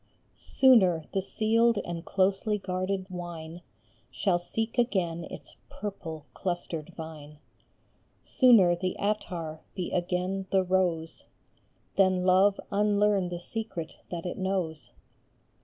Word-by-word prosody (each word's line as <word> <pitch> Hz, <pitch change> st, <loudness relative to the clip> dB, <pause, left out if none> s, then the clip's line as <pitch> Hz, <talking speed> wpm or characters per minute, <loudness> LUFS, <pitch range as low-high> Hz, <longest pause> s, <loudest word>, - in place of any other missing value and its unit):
Sooner 190 Hz, -12 st, +4 dB
the 195 Hz, -, +1 dB
sealed 225 Hz, +3 st, +2 dB
and 170 Hz, -1 st, -5 dB
closely 195 Hz, +3 st, +1 dB
guarded 190 Hz, 0 st, -2 dB
wine 175 Hz, -2 st, -7 dB, 0.5 s
Shall 175 Hz, +8 st, +1 dB
seek 225 Hz, +7 st, -3 dB
again 175 Hz, -8 st, 0 dB
its -, -, -11 dB
purple 165 Hz, -7 st, -6 dB
clustered 175 Hz, -3 st, -4 dB
vine, 155 Hz, -2 st, -9 dB, 0.9 s
Sooner 220 Hz, -9 st, +5 dB
the 185 Hz, +1 st, -2 dB
attar 175 Hz, -7 st, -3 dB
be 180 Hz, -, -3 dB
again 180 Hz, +2 st, -1 dB
the 190 Hz, -1 st, +3 dB
rose, 180 Hz, -3 st, 0 dB, 0.7 s
Than 185 Hz, -2 st, +3 dB
Love 190 Hz, +2 st, +4 dB
unlearn 205 Hz, -2 st, +2 dB
the 175 Hz, -, -4 dB
secret 180 Hz, -4 st, -6 dB
that 170 Hz, -1 st, -5 dB
it 180 Hz, -, -4 dB
knows 180 Hz, -7 st, -2 dB
185 Hz, 110 wpm, -28 LUFS, 170-200 Hz, 0.9 s, Sooner